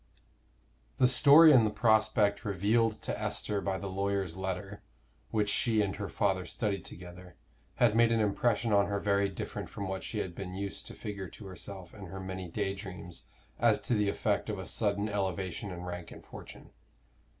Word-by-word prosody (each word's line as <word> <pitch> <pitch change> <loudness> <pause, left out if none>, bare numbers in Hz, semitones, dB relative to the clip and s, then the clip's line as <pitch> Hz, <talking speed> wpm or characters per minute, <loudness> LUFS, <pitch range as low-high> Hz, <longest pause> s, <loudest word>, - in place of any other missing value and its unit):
The - - +4
story 150 +5 +8
and 130 -5 +7
the 110 - +2
prospect 105 -1 +2
revealed 105 +4 +2
to - - -3
Esther 105 -1 -2
by 95 -1 -1
the 100 - -7
lawyer's 95 -2 -2
letter, 95 +2 -5 0.5
which 105 -2 0
she 110 0 +2
and 95 -2 -2
her 100 -2 -4
father 95 -3 0
studied 100 +1 -2
together, 90 0 -11 0.4
had 120 -3 +3
made 115 0 +5
an 115 - +2
impression 110 +1 +1
on 100 0 +4
her 100 0 -1
very 100 -1 +1
different - - -6
from 100 - -5
what 95 0 -4
she 110 - -4
had 95 -4 -3
been 90 +1 -6
used 100 0 -4
to - - -9
figure 100 -4 -6
to 105 - -12
herself 95 -1 -8
in 100 -3 -9
her 95 +3 -7
many 95 -1 -5
day 95 +2 -1
dreams 95 -3 -8 0.3
as - - +4
to - - -1
the 105 -2 +2
effect - - -1
of - - -2
a - - -6
sudden 100 0 0
elevation 95 -2 -2
in 90 -1 -7
rank 90 -1 -6
and - - -12
fortune. - - -12
100 Hz, 185 wpm, -31 LUFS, 95-105 Hz, 0.5 s, story